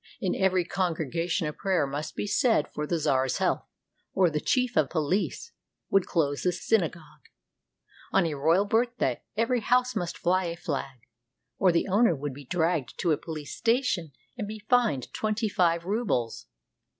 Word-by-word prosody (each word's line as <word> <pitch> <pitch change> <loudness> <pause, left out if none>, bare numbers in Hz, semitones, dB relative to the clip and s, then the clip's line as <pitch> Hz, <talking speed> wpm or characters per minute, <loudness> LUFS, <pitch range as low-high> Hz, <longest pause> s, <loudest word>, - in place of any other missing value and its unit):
In 185 - 0
every 185 -2 +2
congregation 170 -1 -1
a 150 - -2
prayer 190 -5 0
must 145 +3 -5
be - - -2
said 225 - +2
for 150 0 -3
the 170 - 0
czar's 130 -4 +1
health, - - 0 0.5
or 185 -3 +4
the 150 - 0
chief 250 +7 +1
of 150 - +3
police 180 - -1 0.4
would 195 -2 +3
close 145 -4 0
the 180 - +2
synagogue. 165 - -2 0.8
On 195 -2 +3
a 160 - -1
royal 165 +8 +3
birthday 225 - 0 0.2
every 230 +2 +2
house 250 +3 +2
must 175 -5 -3
fly 185 +1 +1
a 170 0 -3
flag, 135 -6 -4 0.6
or 185 - +5
the 170 - +1
owner 200 -1 +4
would 145 0 -4
be 140 +1 -11
dragged 165 -3 -1
to 170 - +2
a - - +4
police 155 -3 -7
station 230 - +1 0.3
and 210 - -2
be 215 +1 -6
fined 215 - +1
twenty 215 +1 -1
five 170 -4 +1
rubles. 190 - -1
175 Hz, 165 wpm, -27 LUFS, 150-210 Hz, 0.8 s, or